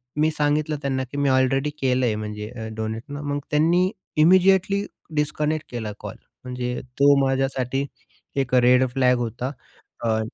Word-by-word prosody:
मी 155 +1 +3
सांगितलं 150 0 0
त्यांना 135 -2 -1
की 145 - -6
मी 140 -1 +2
ऑलरेडी 130 +2 +2
केलंय 125 -4 +2
म्हणजे 105 0 -5
अ, 110 -2 -7
डोनेट 110 +1 -4
ना, 145 +1 -5
मग 145 0 -2
त्यांनी 170 +5 +3 0.3
इमिडिएटली 190 +3 +4 0.3
डिस्कनेक्ट 150 +1 -1
केला 110 -3 -4
कॉल. - - -7 0.3
म्हणजे 125 -1 -3 0.2
तो 140 0 +6
माझ्यासाठी 135 0 0 0.6
एक 130 -1 -5
रेड 125 +1 +5
फ्लॅग 125 -2 +3
होता. 120 +3 -3 0.5
अ 110 -1 +1
135 Hz, 145 wpm, -23 LUFS, 125-150 Hz, 0.6 s, तो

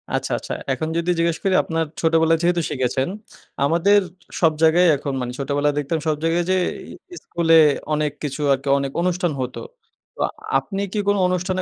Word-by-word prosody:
আচ্ছা, - - -2
আচ্ছা - - -6 0.2
এখন 135 +4 -2
যদি 170 +1 -1
জিজ্ঞেস 170 -1 +1
করি 195 - +1
আপনার 165 0 -1 0.2
ছোটবেলায় 165 0 +3
যেহেতু 175 0 +2
শিখেছেন, 130 0 -1 0.6
আমাদের 170 +7 +4 0.4
সব 165 -2 +5
জায়গায় 165 +3 +5
এখন 140 0 -4
মানে 125 0 -3
ছোটবেলায় 145 +1 0
দেখতাম 150 +3 -2
সব 155 - +2
জায়গায় 165 +1 +1
যে - - +3 0.6
এ - - -7
স্কুলে 165 -1 +2 0.4
অনেক 150 -1 0
কিছু 145 0 -4
আরকি 135 +1 -4
অনেক 140 -1 -3
অনুষ্ঠান 180 -1 0
হতো। 125 0 -4 0.6
তো - - -20 0.4
আপনি 195 -1 -4
কি - - -2
কোনো 205 0 +2
অনুষ্ঠানে 185 +1 -1
165 Hz, 170 wpm, -21 LUFS, 145-175 Hz, 0.6 s, সব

